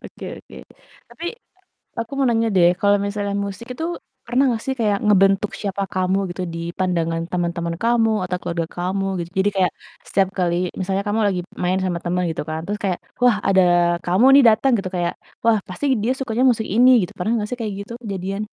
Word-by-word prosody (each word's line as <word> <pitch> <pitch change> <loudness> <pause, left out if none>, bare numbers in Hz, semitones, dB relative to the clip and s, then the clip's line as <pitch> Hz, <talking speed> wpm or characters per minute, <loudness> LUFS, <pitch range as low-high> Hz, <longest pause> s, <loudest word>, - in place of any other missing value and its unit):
Oke - - -11 0.2
oke, - - -16 0.5
tapi 335 - -10 0.7
aku 230 0 -3
mau 270 - +3
nanya 230 -1 +2
deh 175 -1 +6
kalau 205 -1 +4
misalnya 200 0 -3
musik 200 +3 -7
itu 320 - -4 0.4
pernah 245 +3 +2
gak 225 - -5
sih 265 - 0
kayak 210 -3 +2
ngebentuk 195 0 +4
siapa 200 -1 -2
kamu 185 +1 +1
gitu, 175 +1 -5
di - - -4 0.2
pandangan 165 -3 0
teman-teman 170 -1 -2
kamu, 230 -1 +3
atau 180 0 -2
keluarga 170 -1 -2
kamu 190 +2 -1 0.2
gitu? 170 - -9
Jadi 190 +2 +3
kayak 185 -2 +2 0.3
setiap 195 -1 +2
kali 175 -2 +1 0.3
misalnya 190 +1 -1
kamu 210 +2 0
lagi 185 -3 0 0.2
main 180 +1 +1
sama 175 -2 -1
temen 180 +1 0
gitu 160 - -3
kan 160 0 -3
terus 205 +1 -3
kayak, 185 -3 0 0.2
"Wah, 245 -3 +5
ada 190 -1 +5 0.4
kamu 185 +7 +3
nih 280 - +7
dateng," 225 +5 +3
gitu 190 -2 -4
kayak, 175 -1 -1 0.3
"Wah 230 -1 +4
pasti 185 +10 -6 0.2
dia 235 +4 +1
sukanya 250 -1 0
musik 220 -2 -1
ini," 250 +3 +6
gitu. 180 - -4
Pernah 205 +5 0
gak 210 - -4
sih 250 - -4
kayak 215 -2 -2
gitu 200 +3 -8
kejadian? 195 -1 -4
195 Hz, 200 wpm, -21 LUFS, 180-225 Hz, 0.7 s, nih